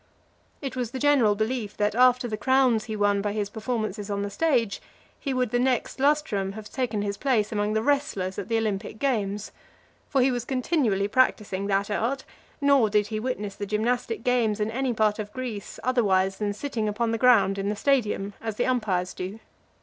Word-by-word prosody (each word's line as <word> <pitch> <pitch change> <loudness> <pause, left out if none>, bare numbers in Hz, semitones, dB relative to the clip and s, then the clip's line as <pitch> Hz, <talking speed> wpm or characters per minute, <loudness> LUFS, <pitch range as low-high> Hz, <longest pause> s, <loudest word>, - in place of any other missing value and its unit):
It 270 - -4
was 250 -3 -2
the 260 - -6
general 260 -7 +4
belief, 220 0 -2
that, 210 0 +1
after 250 +1 +4
the 220 - -3
crowns 250 0 +2
he 220 -2 -4
won 205 -1 +2
by 205 0 -2
his 205 -1 -2
performances 215 -2 -3
on 200 0 -1
the 200 - -4
stage, 240 -4 +1 0.4
he 275 - -3
would 255 -3 0
the 245 - +2
next 255 0 0
lustrum 270 -9 +1
have 215 0 -9
taken 230 -6 -1
his 200 -1 -3
place 225 -6 +1
among 210 0 0
the 220 0 0
wrestlers 235 -10 0
at 190 - -5
the 230 0 +1
Olympic 210 -1 -2
games. 210 -6 -1 0.6
For 270 - +2
he 265 - +3
was 245 -2 -2
continually 250 - 0
practising 205 -5 +1
that 200 +1 0
art; 250 +6 -1 0.4
nor 280 -6 +4
did 210 0 +2
he 215 -1 -2
witness 215 -4 -3
the 205 0 -6
gymnastic 225 +2 -1
games 235 -4 +1
in 210 +1 -1
any 260 +2 -1
part 215 -2 +1
of 210 -1 -5
Greece 240 -6 -6
otherwise 195 -6 +2
than 205 -1 -1
sitting 220 -2 -2
upon 225 +2 -1
the 225 - -1
ground 200 -6 +4
in 195 +1 -1
the 210 - -1
stadium, 210 -5 0
as 220 -2 -4
the 240 - 0
umpires 210 -8 0
do. 185 +4 -5
220 Hz, 195 wpm, -26 LUFS, 205-255 Hz, 0.6 s, general